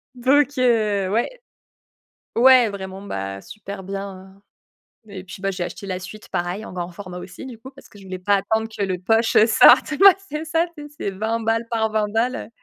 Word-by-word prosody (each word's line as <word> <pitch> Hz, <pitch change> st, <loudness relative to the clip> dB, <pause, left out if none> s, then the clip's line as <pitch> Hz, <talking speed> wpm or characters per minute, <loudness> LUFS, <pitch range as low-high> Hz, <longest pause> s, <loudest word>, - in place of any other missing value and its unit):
donc 280 Hz, +3 st, +2 dB
heu, 215 Hz, -6 st, +2 dB
ouais. 240 Hz, -, -1 dB, 1.0 s
Ouais, 250 Hz, -1 st, +6 dB
vraiment, 190 Hz, -1 st, -7 dB
bah, 95 Hz, -, -5 dB
super 200 Hz, -, -9 dB
bien, 195 Hz, 0 st, -8 dB, 0.7 s
heu, -, -, -13 dB
et 190 Hz, -2 st, -8 dB
puis, 190 Hz, 0 st, -11 dB
bah, 195 Hz, -, 0 dB
j'ai 180 Hz, -2 st, -3 dB
acheté 195 Hz, +3 st, -7 dB
la 185 Hz, -1 st, -3 dB
suite, 195 Hz, +4 st, -11 dB
pareil, 180 Hz, +3 st, -3 dB
en -, -, -10 dB
grand 175 Hz, -1 st, -5 dB
format, 180 Hz, 0 st, -9 dB
aussi 180 Hz, +8 st, -9 dB
du 245 Hz, -3 st, -9 dB
coup, 260 Hz, +5 st, -12 dB
parce 275 Hz, -, -17 dB
que -, -, -17 dB
je 200 Hz, -, -14 dB
voulais 185 Hz, -1 st, -7 dB
pas 200 Hz, +3 st, +2 dB
attendre 220 Hz, +3 st, 0 dB
que 215 Hz, -2 st, -4 dB
le 185 Hz, -2 st, -2 dB
poche, 225 Hz, +5 st, +1 dB
heu, 215 Hz, -, +6 dB
sorte. 230 Hz, -, +6 dB
Ouais, 390 Hz, +4 st, +7 dB
c'est 305 Hz, +2 st, -4 dB
ça, 330 Hz, +2 st, +1 dB
tu 295 Hz, -, -8 dB
sais, 295 Hz, -, -10 dB
c'est -, -, -2 dB
20 220 Hz, +4 st, -2 dB
balles 225 Hz, +1 st, 0 dB
par 220 Hz, -1 st, 0 dB
20 215 Hz, -1 st, 0 dB
balles, 230 Hz, +4 st, 0 dB
heu. -, -, -7 dB
205 Hz, 220 wpm, -22 LUFS, 190-235 Hz, 1.0 s, Ouais